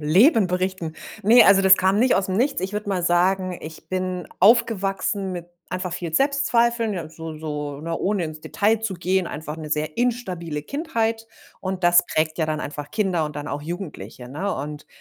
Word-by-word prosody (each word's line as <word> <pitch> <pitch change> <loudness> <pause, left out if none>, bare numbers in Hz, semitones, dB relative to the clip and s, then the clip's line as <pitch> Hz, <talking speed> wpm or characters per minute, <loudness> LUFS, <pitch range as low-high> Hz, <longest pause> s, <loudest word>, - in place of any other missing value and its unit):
Leben 195 - +5
berichten. 180 -3 -2 0.3
Ne, 230 +4 +7
also 195 0 +6
das 190 0 +8
kam 190 +2 +2
nicht 255 +1 +4
aus 190 0 0
'm 185 - -1
Nichts. 270 +2 +1
Ich 190 +2 -3
würde 210 0 -4
mal 185 -3 0
sagen, 180 +1 +2
ich 155 0 -10
bin 185 -1 -3
aufgewachsen 200 -2 +2
mit 175 -1 -6 0.2
einfach 185 -1 -3
viel 175 -2 -4
Selbstzweifeln, 235 - +2
ja, 170 -4 -5
so 160 0 -8
so 150 -2 -5
ne, 165 +1 -3
ohne 200 -2 0
ins 155 -1 -7
Detail 215 +6 +1
zu 220 -3 -2
gehen, 185 +1 0
einfach 155 0 -6
'ne 155 -2 -8
sehr 155 0 -2
instabile 185 -11 -2
Kindheit. 230 - -2 0.3
Und 185 -1 -3
das 175 0 +6
prägt 155 -1 0
ja 160 - +1
dann 155 0 -1
einfach 145 0 -6
Kinder 185 -4 0
und 150 -1 -8
dann 145 0 -5
auch 145 +1 -4
Jugendliche, 150 - -7
ne? 175 +10 -3
Und 150 +2 -6
185 Hz, 190 wpm, -23 LUFS, 155-205 Hz, 0.3 s, das